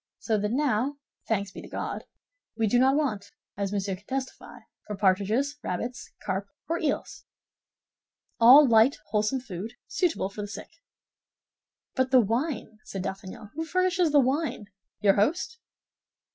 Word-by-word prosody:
So 225 Hz, -, -1 dB
that 210 Hz, +1 st, -1 dB
now, 270 Hz, 0 st, +1 dB, 0.3 s
thanks 200 Hz, -3 st, -1 dB
be -, -, -9 dB
to -, -, -11 dB
God, -, -, -5 dB, 0.5 s
we 225 Hz, -, +2 dB
do 240 Hz, +4 st, +3 dB
not 265 Hz, +2 st, +4 dB
want, 215 Hz, -10 st, -1 dB, 0.3 s
as 200 Hz, -1 st, -2 dB
Monsieur 195 Hz, -1 st, -1 dB
can 195 Hz, +3 st, -20 dB
testify, 265 Hz, 0 st, -5 dB, 0.3 s
for 210 Hz, -, -4 dB
partridges, 210 Hz, +9 st, +1 dB
rabbits, 240 Hz, +7 st, -4 dB
carp 195 Hz, 0 st, -2 dB, 0.2 s
or 335 Hz, +1 st, -1 dB
eels—all 280 Hz, -2 st, +1 dB
light, 230 Hz, +3 st, +5 dB
wholesome 215 Hz, +5 st, +1 dB
food, 215 Hz, -1 st, -7 dB
suitable 330 Hz, -, 0 dB
for 210 Hz, -, -6 dB
the 205 Hz, -, -4 dB
sick." 205 Hz, -, -8 dB, 1.2 s
"But 260 Hz, 0 st, +1 dB
the 260 Hz, -1 st, +6 dB
wine," 230 Hz, 0 st, -1 dB
said 195 Hz, -3 st, -5 dB
D'Artagnan, 195 Hz, +2 st, -7 dB
"who 320 Hz, -, -3 dB
furnishes 365 Hz, 0 st, +1 dB
the 290 Hz, -, +6 dB
wine? 270 Hz, -3 st, 0 dB, 0.4 s
Your 200 Hz, -2 st, +5 dB
host?" 345 Hz, -, 0 dB
230 Hz, 145 wpm, -27 LUFS, 205-280 Hz, 1.2 s, the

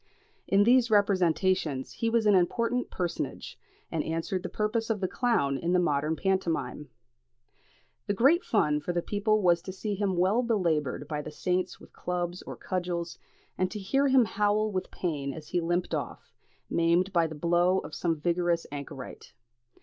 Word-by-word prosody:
In 200 Hz, +1 st, +4 dB
these 240 Hz, +1 st, +4 dB
representations 185 Hz, -7 st, +2 dB
he 230 Hz, -, -1 dB
was 230 Hz, -1 st, +2 dB
an 210 Hz, -, +5 dB
important 230 Hz, +7 st, +1 dB
personage, 175 Hz, -2 st, -4 dB, 0.3 s
and -, -, -1 dB
answered 165 Hz, +3 st, -2 dB
the -, -, -5 dB
purpose 225 Hz, +2 st, -1 dB
of 220 Hz, -2 st, 0 dB
the 185 Hz, -, 0 dB
clown 160 Hz, -, +1 dB
in 170 Hz, +1 st, 0 dB
the 180 Hz, -, +4 dB
modern 150 Hz, -2 st, +1 dB
pantomime. 170 Hz, -6 st, -1 dB, 1.2 s
The 205 Hz, -, 0 dB
great 285 Hz, -, +4 dB
fun 150 Hz, -9 st, +2 dB
for 175 Hz, -, -3 dB
the 175 Hz, -1 st, -1 dB
people 215 Hz, 0 st, +1 dB
was 175 Hz, -2 st, +4 dB
to 185 Hz, -, -7 dB
see 205 Hz, +3 st, -4 dB
him 195 Hz, -2 st, -1 dB
well 190 Hz, +7 st, +3 dB
belaboured 165 Hz, -, 0 dB
by 150 Hz, -1 st, -3 dB
the -, -, -7 dB
saints 180 Hz, +4 st, -2 dB
with -, -, -16 dB
clubs 175 Hz, 0 st, -3 dB
or -, -, -8 dB
cudgels, 175 Hz, -2 st, -3 dB, 0.4 s
and 185 Hz, 0 st, +1 dB
to 215 Hz, -, -6 dB
hear 270 Hz, +8 st, +1 dB
him 260 Hz, -3 st, +5 dB
howl 210 Hz, +1 st, +1 dB
with 185 Hz, -2 st, -3 dB
pain 145 Hz, -6 st, -3 dB
as 155 Hz, -2 st, -10 dB
he 175 Hz, -, 0 dB
limped 175 Hz, +2 st, -1 dB
off, -, -, -5 dB, 0.3 s
maimed 170 Hz, +3 st, +2 dB
by 170 Hz, -2 st, +3 dB
the 155 Hz, -, -8 dB
blow 175 Hz, +3 st, +2 dB
of 160 Hz, -, -5 dB
some 165 Hz, -3 st, -1 dB
vigorous 170 Hz, +1 st, 0 dB
anchorite. 140 Hz, -2 st, -8 dB
180 Hz, 170 wpm, -28 LUFS, 165-205 Hz, 1.2 s, an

